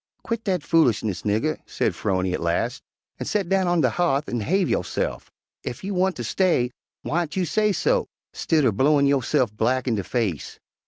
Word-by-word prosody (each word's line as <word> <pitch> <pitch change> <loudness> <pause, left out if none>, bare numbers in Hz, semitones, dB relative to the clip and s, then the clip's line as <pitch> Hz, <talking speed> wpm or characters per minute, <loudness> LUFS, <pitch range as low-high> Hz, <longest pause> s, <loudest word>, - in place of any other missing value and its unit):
"Quit 230 -1 -3
dat 185 -6 0
foolishness, 115 - +2
nigger," 110 +9 0
said - - 0
'Phrony 95 -1 -1
at - - -2
last, 85 0 -1 0.4
"an' - - -4
set 200 -4 -1
down 190 -1 +2
on 175 -1 +2
de 125 -4 +3
ha'th 150 -1 +1
an' 120 - -2
'have 185 - +1
yo'se'f. - - -2 0.3
Ef 120 - -6
you 200 +1 -3
wanter 185 0 0
stay, 165 -10 +1 0.3
whyn't 165 -1 -1
you 185 -1 +1
sesso, 215 - +1 0.3
stidder 150 -7 +2
blowin' 140 +7 +3
yo'se'f 135 -4 +1
black 125 +4 0
in 120 - +2
de 100 -3 -1
face? 100 - -2
145 Hz, 170 wpm, -24 LUFS, 115-185 Hz, 0.4 s, de